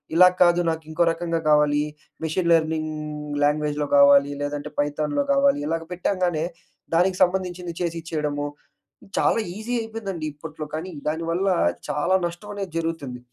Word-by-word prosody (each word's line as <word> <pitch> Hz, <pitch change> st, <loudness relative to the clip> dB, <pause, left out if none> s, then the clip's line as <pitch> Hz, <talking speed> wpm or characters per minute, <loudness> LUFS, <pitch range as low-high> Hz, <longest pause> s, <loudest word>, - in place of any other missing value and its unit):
ఇలా 180 Hz, +2 st, +9 dB
కాదు 175 Hz, -1 st, +6 dB
నాకు 160 Hz, 0 st, -2 dB
ఇంకో 160 Hz, +2 st, +2 dB
రకంగా 165 Hz, 0 st, -2 dB
కావాలి, 150 Hz, -1 st, +4 dB, 0.4 s
మెషిన్ 170 Hz, +2 st, 0 dB
లెర్నింగ్ 155 Hz, -1 st, +2 dB, 0.5 s
లాంగ్వేజ్‌లో 150 Hz, 0 st, +1 dB
కావాలి, 140 Hz, 0 st, +6 dB
లేదంటే 145 Hz, +1 st, -3 dB
పైథాన్‍లో 145 Hz, -, 0 dB
కావాలి. 275 Hz, -, +3 dB
ఇలాగ 165 Hz, +1 st, -1 dB
పెట్టంగానే 180 Hz, -3 st, 0 dB, 0.5 s
దానికి 180 Hz, +2 st, +3 dB
సంబంధించింది 180 Hz, -1 st, -1 dB
చేసి 170 Hz, -1 st, -1 dB
ఇచ్చేయడము. 150 Hz, -3 st, -2 dB, 0.7 s
చాలా -, -, +3 dB, 0.2 s
ఈజీ 220 Hz, +3 st, -4 dB
అయిపోయిందండి 215 Hz, -7 st, -5 dB
ఇప్పట్లో. 155 Hz, +1 st, -8 dB
కానీ 170 Hz, +4 st, -5 dB, 0.2 s
దాని 160 Hz, +2 st, -3 dB
వల్ల 180 Hz, +3 st, 0 dB, 0.4 s
చాలా 150 Hz, +6 st, +1 dB
నష్టం 175 Hz, +4 st, -10 dB
అనేది 195 Hz, -3 st, -5 dB
జరుగుతుంది. 160 Hz, -7 st, -3 dB
165 Hz, 135 wpm, -24 LUFS, 150-180 Hz, 0.7 s, ఇలా